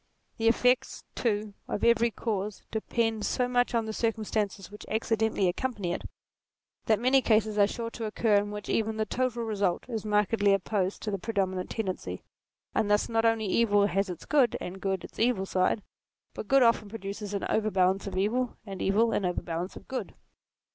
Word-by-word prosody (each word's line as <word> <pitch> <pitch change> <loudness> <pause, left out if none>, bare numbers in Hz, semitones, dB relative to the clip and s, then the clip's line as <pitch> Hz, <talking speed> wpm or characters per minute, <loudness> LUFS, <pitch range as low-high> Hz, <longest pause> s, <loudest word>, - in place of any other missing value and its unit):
The 225 - +2
effects 250 +2 +2
too 210 -3 -1
of - - -3
every 235 0 +4
cause 210 -3 -3
depend 225 0 -1
so 250 +4 +1
much 245 -1 +1
on 230 -1 +1
the 220 - -4
circumstances 215 -4 -2
which 210 - -10
acci 225 +1 0
dentally 220 -3 +1
accompany 200 -2 -2
it, - - -5 0.8
that 220 - +4
many 260 +3 +4
cases 215 -3 +2
are 200 - +6
sure 230 +2 -4
to 230 - -5
occur 215 0 +2
in 205 0 0
which 210 0 -6
even 220 0 0
the 220 - 0
total 240 +1 -1
result 200 -5 -1
is 225 -4 -3
markedly 210 -1 +2
opposed 195 0 -1
to 215 - -2
the 195 - -2
predominant 190 -3 -1
tendency: 185 - -4 0.5
and 210 - +1
thus 205 0 +2
not 225 0 +1
only 225 -1 +2
evil 205 0 +3
has 195 0 0
its 175 - -7
good 275 -6 +3
and 190 +2 -7
good 190 -2 -1
its - - -11
evil 225 -5 +2
side, 190 +2 +1 0.5
but 215 - -7
good 270 +2 +5
often 230 -3 +3
produces 205 -1 -5
an 200 - -2
overbalance 195 -3 +1
of 195 - -4
evil 235 +6 0
and 195 -3 -7
evil 220 +4 +3
an 205 - 0
overbalance 180 0 -3
of - - -12
good. 260 -1 -5
215 Hz, 185 wpm, -28 LUFS, 195-230 Hz, 0.8 s, are